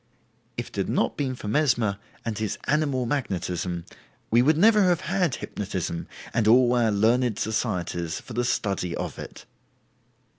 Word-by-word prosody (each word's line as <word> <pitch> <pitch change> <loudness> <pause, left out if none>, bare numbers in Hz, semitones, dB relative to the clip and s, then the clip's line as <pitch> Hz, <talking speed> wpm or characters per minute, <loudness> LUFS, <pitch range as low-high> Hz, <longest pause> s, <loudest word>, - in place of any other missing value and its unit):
If - - -4
it - - -15
had - - -1
not - - +1
been 130 -3 -2
for 110 - -8
Mesmer 120 -6 +2 0.3
and 115 -2 -2
his 110 -1 -2
"Animal 145 -4 +1
Magnetism", 90 - -2 0.5
we 120 +2 +6
would 150 +4 +4
never 215 +4 +6
have 175 -1 +2
had 180 -4 0
"hypnotism" 95 -4 -4 0.3
and 115 -2 +2
all 120 +2 +6
our 120 -2 +3
learned 110 +2 +2
societies 85 -6 -2
for 125 - -11
the 120 +2 0
study 100 -7 -1
of - - -5
it. - - -9
115 Hz, 155 wpm, -26 LUFS, 100-135 Hz, 0.5 s, we